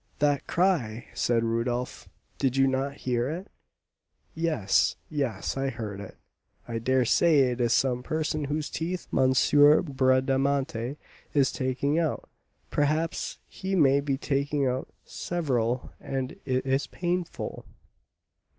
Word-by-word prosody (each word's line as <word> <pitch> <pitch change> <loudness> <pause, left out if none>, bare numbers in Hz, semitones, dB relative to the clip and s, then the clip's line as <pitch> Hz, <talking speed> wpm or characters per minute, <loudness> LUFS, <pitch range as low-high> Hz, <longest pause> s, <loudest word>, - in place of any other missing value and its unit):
"That 145 -1 +1
cry!" 135 - 0
said 115 -1 +1
Rodolph; 120 +2 -2 0.3
"did 135 -1 +1
you 135 - +5
not 135 +1 0
hear 125 0 +1
it?" 180 +6 -6 0.8
"Yes, 155 - +1 0.2
yes, 130 -10 -2
I 135 0 -1
heard 105 -6 -6
it; 100 -2 -9 0.5
I 115 -1 -3
dare 130 +2 +2
say 155 +4 +4
it 125 0 -3
is 120 -1 +2
some 125 -1 +2
person 155 +2 -2
whose 150 +1 -3
teeth 175 +2 -3
M. 130 0 +4 0.5
Bradamanti 135 -2 +1 0.4
is 140 -3 +4
taking 135 +4 0
out; 160 -3 -1 0.4
perhaps 155 +3 0
he 190 +1 -3
may 140 -5 +5
be 140 -1 -1
taking 140 0 0
out 130 0 -1 0.2
several, 125 -8 -2
and 135 -1 -3
it 130 0 0
is 135 +1 +1
painful!" 175 0 -3
135 Hz, 125 wpm, -27 LUFS, 125-150 Hz, 0.8 s, you